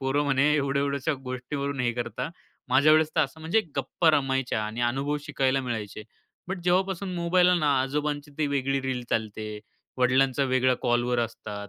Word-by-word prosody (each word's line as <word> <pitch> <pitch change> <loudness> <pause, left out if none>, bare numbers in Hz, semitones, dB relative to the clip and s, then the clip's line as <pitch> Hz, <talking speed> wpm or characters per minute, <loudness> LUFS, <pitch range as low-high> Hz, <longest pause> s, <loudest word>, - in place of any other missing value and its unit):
पोरं 135 +2 +1
म्हणे 140 +1 +3
एवढ्या-एवढ्याशा 140 0 0
गोष्टीवरून 135 +2 -4
हे 120 -1 +1
करता, 120 +4 -4 0.4
माझ्यावेळेस 155 +4 +5
तर - - +5
असं," 160 +4 -11
म्हणजे 165 +8 +2 0.2
गप्पा 140 +5 +2
रमायच्या 135 -6 0
आणि 110 +3 -5
अनुभव 140 +4 -1
शिकायला 135 -2 +1
मिळायचे. 110 -4 -5 0.5
बट 190 - -3
जेव्हापासून 185 +1 0
मोबाईल 175 +1 +3
आलं 180 -2 +3
ना, 145 -3 +3
आजोबांची 145 +2 -2
ती 155 - +1
वेगळी 135 -1 0
रील 130 -2 -3
चालते, 110 -1 -3 0.4
वडिलांचा 130 +2 +3
वेगळ्या 130 -1 +2
कॉलवर 120 0 +1
असतात. 105 -3 -5
135 Hz, 155 wpm, -26 LUFS, 125-150 Hz, 0.5 s, माझ्यावेळेस